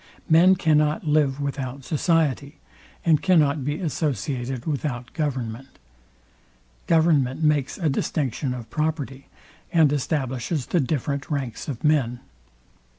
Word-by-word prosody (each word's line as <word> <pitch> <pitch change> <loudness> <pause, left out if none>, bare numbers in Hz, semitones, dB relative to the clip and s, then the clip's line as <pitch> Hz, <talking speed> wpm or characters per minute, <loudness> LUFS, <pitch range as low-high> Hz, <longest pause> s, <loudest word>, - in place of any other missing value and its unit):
Men 175 +4 +6
cannot 150 -4 +2
live 145 -2 +2
without 135 -1 -4
society, 150 -2 0 0.5
and 160 -3 +4
cannot 155 -6 +3
be 145 +3 -2
associated 130 - -2
without 135 -5 -3
government. 130 -5 -4 1.1
Government 160 -4 +3
makes 150 -3 +1
a 170 - -1
distinction 135 -2 -1
of 115 -2 -9
property, 150 -3 -3 0.4
and 160 -4 +4
establishes 135 0 -2
the 175 - +1
different 140 -1 -2
ranks 135 -6 -3
of 135 -6 -5
men. 135 -6 +2
145 Hz, 110 wpm, -24 LUFS, 130-155 Hz, 1.1 s, Men